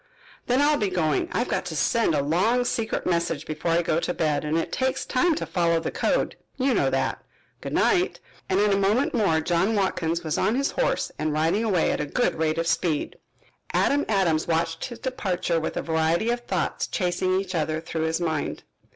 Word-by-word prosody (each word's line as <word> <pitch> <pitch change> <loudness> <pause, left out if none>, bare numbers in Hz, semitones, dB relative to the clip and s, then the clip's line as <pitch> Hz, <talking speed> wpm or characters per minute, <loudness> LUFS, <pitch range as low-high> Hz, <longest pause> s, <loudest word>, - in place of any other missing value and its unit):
"Then 255 +3 +3
I'll 295 0 +3
be 205 -3 +1
going. 160 -6 0
I've 240 - 0
got - - -1
to 170 -3 -5
send 195 +2 +2
a 140 - +1
long 210 - +2
secret 225 -2 -2
message 170 -4 0
before 155 +2 -3
I 170 +1 +3
go 165 0 +1
to 175 - -2
bed 150 -3 0
and 150 +2 0
it 165 - -2
takes 260 0 -1
time 315 +6 +2
to - - -3
follow 170 -2 +1
the 165 - -3
code, - - 0 0.2
you 265 0 +2
know - - +2
that. - - -1 0.4
Good - - -5
night," 365 0 +2 0.3
and 190 - +2
in 205 0 +3
a - - +2
moment 210 +8 +2
more 195 -10 +2
John 175 +6 +1
Watkins 170 -4 0
was 155 -2 -1
on 220 - +2
his 275 +2 0
horse - - 0
and 155 -1 0
riding 165 +8 +1
away 195 -7 +2
at - - -1
a 150 - -3
good 245 - +1
rate 155 0 0
of 165 - 0
speed. 160 -2 -1 0.5
Adam 285 +1 +2
Adams 175 -7 +2
watched 165 0 -1
his 240 -2 -7
departure 185 -9 -1
with 160 - -4
a - - -1
variety 165 +7 +1
of 240 - -1
thoughts - - -1
chasing 185 0 0
each 195 -1 -5
other 155 -1 -1
through 160 -1 -3
his 160 +1 0
mind. 160 -4 -2
175 Hz, 210 wpm, -25 LUFS, 160-225 Hz, 0.5 s, Then